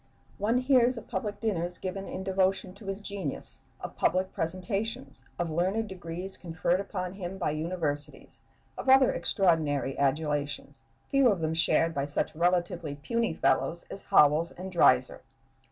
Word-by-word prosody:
One 220 +5 +2
hears 255 -1 +3
of 230 - -8
public 205 +2 -3
dinners 180 -5 -2
given 195 +1 -5
in 190 - -5
devotion 190 0 0
to 200 0 -13
his 195 +1 -4
genius, 195 -9 -5 0.2
of - - -7
public 185 +2 +1
presentations, 195 +7 -2
of 170 -2 -2
learned 190 +7 0
degrees 180 +1 -7
conferred 170 +1 -1
upon 185 -2 -4
him 190 -1 -6
by 175 -5 -1
universities, 155 -2 -3 0.4
of - - -2
other 265 0 +6
extraordinary 155 -8 +1
adulations, 145 0 -1 0.3
few 275 -2 +5
of 200 -5 +1
them 160 0 -1
shared 165 0 +2
by 140 -2 -1
such 145 +2 -2
relatively 175 -2 0
puny 230 +6 -1
fellows 170 +1 +1
as 195 - -7
Howells 160 -3 +4
and 185 +1 -8
Dreiser. 130 -7 +3
180 Hz, 150 wpm, -29 LUFS, 160-195 Hz, 0.4 s, other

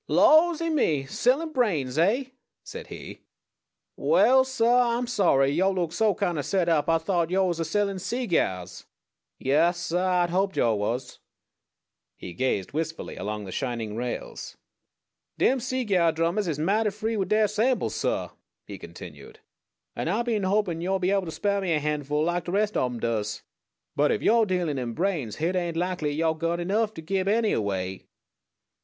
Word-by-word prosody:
"Lawsy 330 +1 +4
me! 155 - +1
Sellin' 270 - +1
brains, 165 - 0
eh?" 210 +11 +3 0.4
said - - -9
he. - - -10 0.7
"Waal, 265 - +4
suh, 260 -3 -1 0.3
Ah'm 245 - -2
sorry. 180 - +2
Yo' 185 +6 +2
look 175 -4 -2
so 210 +1 +2
kind 170 -3 -1
o' - - +1
set 185 +3 0
up 155 -3 +2
Ah 165 - +4
thought 170 0 -1
yo' 190 +1 +2
was 175 -2 -1
a - - +1
sellin' 200 +3 -1
seegyars. 160 - -2 0.5
Yaas, 155 +6 +2
suh 175 0 -2
Ah'd 180 -2 +1
hoped 190 +2 0
yo' 115 -2 +3
was." 120 +5 -3 1.0
He 90 - -8
gazed 125 -5 -1
wistfully 160 +2 -4
along 105 0 -5
the 95 - -8
shining 115 -3 -3
rails. 120 +1 -5 0.8
"Dem 265 - +3
seegyar 210 -10 +1
drummahs 170 +5 0
is 155 -4 -2
mighty 205 +8 +1
free 215 +3 -3
wid 195 -3 -1
deir 215 0 +3
samples, 225 +5 0
suh," - - -1 0.4
he - - -9
continued, 445 0 -11 0.6
"and - - -2
Ah 240 - 0
been 225 -4 -1
a - - 0
hopin' 190 -5 0
yo'd 190 +1 -1
be 185 - +2
able 195 -2 +1
to 160 - -5
spar' 200 +3 -1
me 180 -3 0
a 155 - +2
han'ful 150 0 -1
like 175 0 -1
de 175 - -4
res' 210 +2 0
ob 125 -1 0
'em 120 - -6
does. 110 -2 -2 0.5
But 150 0 +3
ef - - -1
yo're 225 -1 +4
dealin' 175 -7 -1
in 120 -2 -4
brains, 165 - -2
hit 170 +4 -1
ain't 175 -2 -1
likely 175 -4 -1
yo' 160 +2 +1
got 165 +2 -2
enough 210 +5 0
to 160 - -8
gib 190 +3 -1
any 220 +1 +2
away." 95 -3 -3
175 Hz, 175 wpm, -26 LUFS, 150-210 Hz, 1.0 s, Lawsy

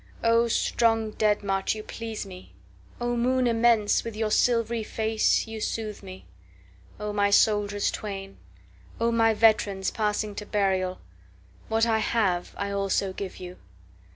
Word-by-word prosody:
8O 230 0 +3
strong 225 -1 +1
dead 210 -1 +1
march, 195 +1 0
you 215 - -7
please 225 -2 -6
me!O 200 +5 -8
moon 255 +2 +1
immense, 230 -3 +3
with 230 -2 -6
your 215 -1 -1
silvery 230 -1 +2
face 220 0 +1
you 225 -1 -7
soothe 215 -1 -3
me!O 90 - -11
my 205 -1 +2
soldiers 205 0 +2
twain! 195 -2 -6 0.6
O 230 0 +2
my 225 -1 +3
veterans, 210 -3 +2
passing 210 -1 -1
to 210 - -7
burial! 190 -2 0 0.7
What 225 +1 +2
I 225 -1 +2
have 195 -6 0
I 200 0 -3
also 195 -1 0
give 195 0 -6
you. 180 0 -9
210 Hz, 135 wpm, -26 LUFS, 195-225 Hz, 0.7 s, 8O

